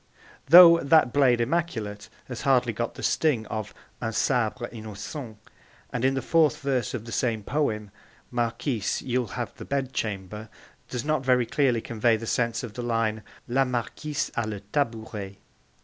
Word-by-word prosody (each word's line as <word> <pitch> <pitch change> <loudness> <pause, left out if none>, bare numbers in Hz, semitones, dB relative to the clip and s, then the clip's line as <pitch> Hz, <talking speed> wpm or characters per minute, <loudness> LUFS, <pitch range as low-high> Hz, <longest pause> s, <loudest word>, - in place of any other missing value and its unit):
though 170 +1 +10
'that 140 -4 +4
blade 130 -4 +4
immaculate' 115 -7 -2 0.2
has 125 -3 -6
hardly 125 -3 +2
got 120 +2 -3
the - - -8
sting 135 -9 +1
of 110 -1 -4 0.3
'un 115 -1 -2
sabre 120 +1 0
innocent'; 110 +2 -7 0.6
and 125 - -2
in 135 +1 +3
the 135 - -2
fourth 160 -3 +3
verse 130 -4 -1
of 115 -2 -6
the 115 - -8
same 115 -3 -1
poem, 105 -7 -1 0.4
'Marquise, 120 -1 -1
you'll 125 -1 -1
have - - -3
the - - -8
bed 135 -2 -2
chamber' 105 +1 -4 0.4
does 125 +1 -4
not 155 -3 0
very 125 -2 +3
clearly 125 -1 +1
convey 115 0 +1
the 115 - -7
sense 115 0 0
of 115 -4 -7
the 125 - -5
line 115 -2 0 0.3
'La 130 +3 +2
Marquise 130 +4 -3
a 120 -2 -1
le 105 -2 -5
tabouret.' 110 -7 -2
120 Hz, 165 wpm, -26 LUFS, 110-135 Hz, 0.6 s, though